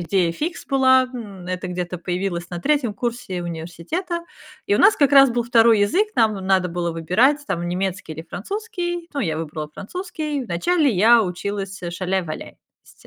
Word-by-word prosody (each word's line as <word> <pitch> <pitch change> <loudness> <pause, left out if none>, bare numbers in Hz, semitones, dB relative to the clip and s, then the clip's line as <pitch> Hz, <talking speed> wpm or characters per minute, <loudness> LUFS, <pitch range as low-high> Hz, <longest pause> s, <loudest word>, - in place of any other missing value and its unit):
идея 175 -1 +1
фикс 320 - -4
была, 260 -2 +5
м, 200 -7 -8
это 185 0 -4
где-то 180 0 -4
появилось 175 0 -3
на 175 - -4
3 280 -2 +1
курсе 230 -5 -3
университета, 175 - -4 0.4
и 410 - +2
у - - +1
нас 405 +2 +6
как 285 -1 +3
раз 275 -2 +8
был 240 0 -1
2 230 -1 +5
язык, 360 - +2
нам 220 -2 +4
надо 190 -1 +2
было 170 0 -2
выбирать 180 - +2
там 175 -2 -2
немецкий 185 -1 -3
или 160 +2 -9
французский, 350 - -4
ну, 285 - -1
я 160 - -1
выбрала 155 -1 -5
французский, 310 - -4
вначале 285 - +1
я 225 +3 +5
училась, 195 +1 -4
э, 175 - -3
шаляй-валяй. 180 -2 -3 0.4
То - - -17
200 Hz, 170 wpm, -22 LUFS, 175-280 Hz, 0.4 s, раз